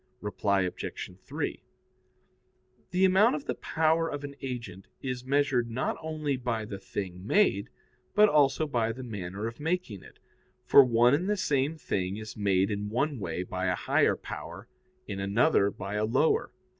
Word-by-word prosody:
Reply 100 -1 0
Obj. 90 0 -4
3: - - -4 1.3
The 185 +1 +3
amount 200 +8 +5
of 295 - -6
the - - -1
power 160 +1 +1
of 145 0 -5
an 140 -1 -7
agent 120 -8 -6 0.2
is 125 -2 -3
measured 135 -3 +1
not 120 +3 -1
only 155 -3 -2
by 120 -3 -2
the 100 -2 -7
thing 90 -3 -6
made, 195 - +3 0.5
but 210 +1 +7
also 150 -3 +3
by 120 -6 0
the 130 +3 -8
manner 100 -3 -5
of 115 +1 -5
making 160 - -2
it; - - -16 0.5
for 140 - +8
one 120 0 +4
and 175 +7 +1
the 210 - +1
same 150 -4 0
thing 95 -8 -2
is 110 0 -8
made 100 -1 +2
in 105 0 -3
one 135 +4 -1
way 90 -2 -3
by 90 +1 -3
a 90 - +2
higher - - +2
power, - - -8 0.4
in 100 - -5
another 100 +2 +3
by 100 0 -6
a 105 +1 +1
lower. 130 +8 +2
120 Hz, 170 wpm, -29 LUFS, 100-150 Hz, 1.3 s, for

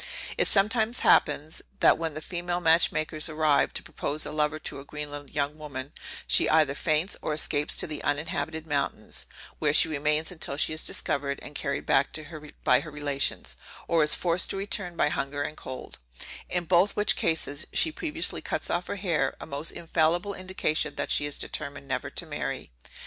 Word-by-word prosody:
It - - +2
sometimes 220 +3 +2
happens, 150 +1 +3 0.2
that - - +6
when 165 -2 -3
the 155 - -6
female 175 0 -2
match 165 0 +5
makers 155 +1 -1
arrive 155 -2 +2
to - - -2
propose 150 +2 -2
a - - -4
lover 150 0 0
to 155 - -6
a - - -9
Greenland 145 -1 -7
young 145 +1 -2
woman, 140 -2 -6 0.3
she - - +4
either 155 -3 +4
faints, 155 +5 0
or 150 - -1
escapes 150 -1 +1
to - - +1
the 150 -1 -5
uninhabited 160 +1 -1
mountains, 145 -3 -2 0.3
where 150 -1 +2
she 165 - +8
remains 150 +2 0
till 140 - -2
she 155 - +2
is 155 - -1
discovered 140 -1 -1
and 145 - -9
carried 140 -1 -2
back 140 +3 +2 0.5
by 125 - +5
her 160 - -7
relations, 145 -2 -1 0.3
or 165 -2 +4
is 150 - +5
forced 175 0 +1
to - - -2
return 195 -2 -2
by 150 - +2
hunger 145 0 -2
and 155 - -5
cold; 130 -3 -8 0.5
in 180 -1 0
both 180 +4 +3
which 210 0 +3
cases, 160 -3 -1
she 320 - +5
previously 320 +1 -1
cuts - - -2
off 175 +1 -1
her - - -3
hair; 165 -9 0
a - - -7
most 145 +3 -3
infallible 170 +4 0
indication, 185 -4 -1
that - - -2
she 145 - +2
is 145 - -2
determined 145 -2 -3
never 130 - -2
to - - -3
marry. - - -4
155 Hz, 185 wpm, -27 LUFS, 145-170 Hz, 0.5 s, she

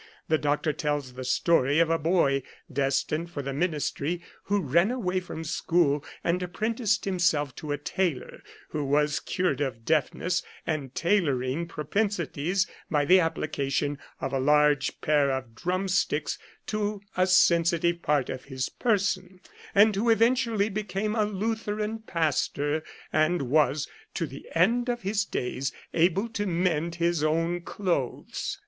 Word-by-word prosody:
The 155 -1 +3
doctor 150 +1 0
tells 145 -4 -2
the 130 +1 -6
story 145 +1 +2
of 165 0 +4
a 165 - +2
boy 150 -4 +2 0.3
destined 140 +5 0
for 145 -4 -5
the 135 0 -3
ministry 160 +1 -1 0.2
who 205 +1 +1
ran 170 - +3
away 190 -7 -1
from 175 -3 -7
school 150 -2 +1 0.2
and 175 +2 +1
apprenticed 215 +4 -1
himself 170 -7 +1
to 155 -3 -5
a 145 - 0
tailor, 165 -1 -2
and - - -14 0.3
who 150 - -2
was 150 +2 +2
cured 180 -7 -1
of 120 -5 -3
deafness 175 +4 +1 0.2
and 145 -5 -3
tailoring 160 -5 +1
propensities 180 0 -1 0.2
by 145 -2 +2
the 185 +5 +7
applica 155 -4 -1
tion 145 +1 0 0.2
of 135 0 -3
a 135 - +1
large 150 0 +3
pair 145 -2 +3
of 130 -3 -3
drumsticks 180 0 0 0.3
to 210 -1 -2
a 185 0 +3
sensitive 170 -1 +3
part 145 -5 +1
of 130 0 -7
his 130 -2 -3
person, 190 -5 0 0.4
and 205 +1 +6
who 225 +4 +1
eventually 230 -2 +3
became 210 0 -2
a 215 -2 +2
Lutheran 215 +1 -2
pastor, 155 -5 0 0.3
and 155 0 +2
was, 145 +2 +2 0.3
to 170 - 0
the 140 -2 -10
end 235 +9 +3
of 240 -1 -2
his 200 +1 0
days, 130 +2 -2 0.2
able 180 +6 +2
to 205 -2 -3
mend 170 -2 0
his 170 -2 +1
own 165 +3 +1
clothes. 175 -8 -2
170 Hz, 145 wpm, -27 LUFS, 145-190 Hz, 0.4 s, the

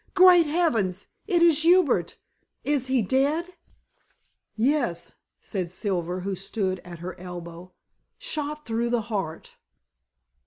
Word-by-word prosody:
"Great 365 -3 +7
heavens! 230 - 0 0.2
it 350 -4 +3
is 325 -3 +5
Hubert; 320 - +3 0.5
is 280 -3 0
he 260 -3 +2
dead?" 290 - 0 1.0
"Yes," 225 - 0 0.3
said 185 -4 -4
Silver, 180 -2 -2
who 195 +2 -3
stood 190 0 -2
at 175 -1 -10
her 175 +2 -6
elbow. 175 0 -9 0.4
"Shot 300 0 -4
through 230 +1 -1
the 240 -1 +1
heart." 165 -6 -4
225 Hz, 115 wpm, -25 LUFS, 180-300 Hz, 1.0 s, Great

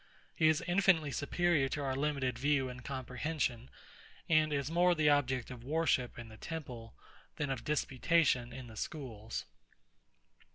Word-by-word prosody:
He 155 - +3
is 155 -1 +3
infinitely 175 -5 +3
superior 150 0 +1
to 145 +1 -3
our 135 -1 -1
limited 135 -4 -1
view 140 -1 +2
and 125 0 -9
comprehension; 130 -1 -3 0.6
and 155 -1 +4
is 140 +1 -1
more 175 +1 +4
the 150 -2 +4
object 130 -3 +1
of 120 -2 -9
worship 145 -3 0
in 120 -1 -7
the 110 0 -12
temple, 125 -9 -7 0.4
than 145 -2 -2
of 125 -3 -3
disputation 140 -3 +1
in 130 +1 -8
the 115 -2 -12
schools. 115 -7 -5
140 Hz, 150 wpm, -33 LUFS, 125-155 Hz, 0.6 s, and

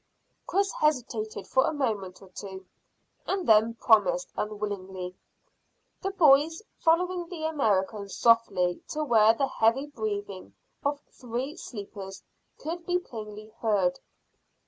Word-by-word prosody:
Chris 395 +1 +1
hesitated 240 -7 -1
for 260 - +3
a - - +1
moment 205 -10 -2
or 190 - -15
two, 190 0 -8 0.6
and 385 -1 -1
then 220 +1 +5
promised - - +3
unwillingly, 195 -3 -4 0.9
the 390 - -1
boys 320 -1 +4 0.2
following 350 +1 +2
the 335 -4 -6
American 210 -9 0
softly 195 -6 +3
to 305 0 -2
where 225 -5 +5
the 275 - +1
heavy 235 +2 +2
breathing 205 -8 -5 0.3
of 285 0 0
three 250 +4 -4
sleepers 200 -3 -8 0.3
could 335 +2 -5
be 355 +1 +1
plainly 215 -8 -8
heard. 195 -5 +1
230 Hz, 120 wpm, -28 LUFS, 205-305 Hz, 0.9 s, then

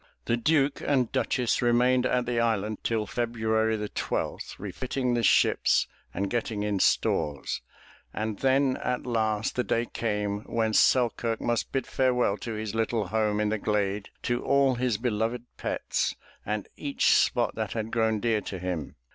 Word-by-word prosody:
The 115 - +2
Duke 140 +3 +2
and 130 -5 +1
Duchess 125 -2 0
remained 125 +1 +3
at 125 -1 +1
the 120 -1 0
island 110 -2 0
till 110 -2 0
February 110 -1 0
the 105 0 -3
twelfth - - -3
refitting 125 +5 -2
the 120 - +1
ships 100 - +3 0.2
and 100 - -2
getting 110 -1 -2
in 105 -2 0
stores, 75 -5 +1 0.5
and 110 -1 -3
then 135 0 +2
at 125 0 -2
last 110 -3 0
the 125 - +1
day 115 0 0
came 105 -3 -2
when 110 -2 0
Selkirk 115 -1 +3
must 120 -1 -1
bid 135 -2 -1
farewell 125 -5 +1
to 115 +3 -5
his 110 -1 -4
little 110 -3 -1
home 105 0 +1
in 105 0 +1
the 110 0 -1
glade, 100 -1 -1
to 120 0 -1
all 140 -1 +3
his 125 -3 0
beloved 115 0 -1
pets, - - -1 0.3
and 105 -1 -2
each 140 -2 +1
spot - - +2
that - - -3
had 110 -1 -3
grown 110 -2 +1
dear 110 -1 +1
to 95 - -6
him. 90 -5 -4
115 Hz, 165 wpm, -27 LUFS, 105-125 Hz, 0.5 s, remained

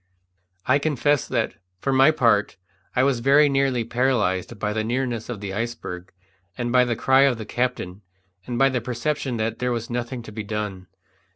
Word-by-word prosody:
I 140 +3 +3
confess 145 -1 +1
that, - - -1 0.3
for 135 +7 -1
my 135 +3 +6
part, 115 -9 +2 0.4
I 125 - +3
was 135 -3 +2
very 140 +4 +5
nearly 135 -3 +1
paralyzed 120 -4 0
by 105 +1 -2
the 110 0 -1
nearness 120 -1 -2
of 115 -5 -5
the 100 -2 -5
iceberg, 100 -5 -5 0.5
and 120 -1 -2
by 125 0 +5
the 120 -1 -1
cry 130 +4 +4
of 130 -4 +2
the 110 - -6
captain, 110 -6 -2 0.5
and 120 -1 -3
by 135 +1 +5
the 125 -2 -1
perception 125 +1 -2
that 110 +1 -2
there 125 0 0
was 120 0 -3
nothing 120 0 -3
to 110 - -10
be 110 +1 -5
done. 105 -3 -4
120 Hz, 185 wpm, -23 LUFS, 110-130 Hz, 0.5 s, my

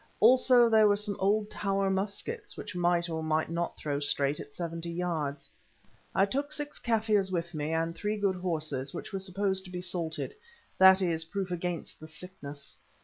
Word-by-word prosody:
Also 250 -1 +6
there 220 -2 +6
were 205 - +4
some 205 0 -2
old 205 +2 +2
tower 195 -1 0
muskets, 215 - -3
which - - -7
might 175 -1 +2
or 160 -1 -3
might 155 0 0
not 170 0 -2
throw 145 -2 -2
straight 145 0 +1
at - - -8
seventy 170 +1 -5
yards. 165 -5 -2 0.7
I 195 - +5
took 280 +8 -2
six 295 -1 -5
Kaffirs 215 -4 +1
with 170 -1 -2
me, 150 0 -2
and 165 +1 0
three 210 +4 -2
good 200 -2 +1
horses, 155 -7 -2
which - - -7
were 195 - -1
supposed 190 0 +1
to 180 - -10
be 180 - -4
salted—that 190 - +2
is, 165 -2 +1
proof 190 +2 -4
against 175 -1 -4
the 155 - -10
sickness. 150 -4 -8
180 Hz, 175 wpm, -30 LUFS, 165-205 Hz, 0.7 s, Also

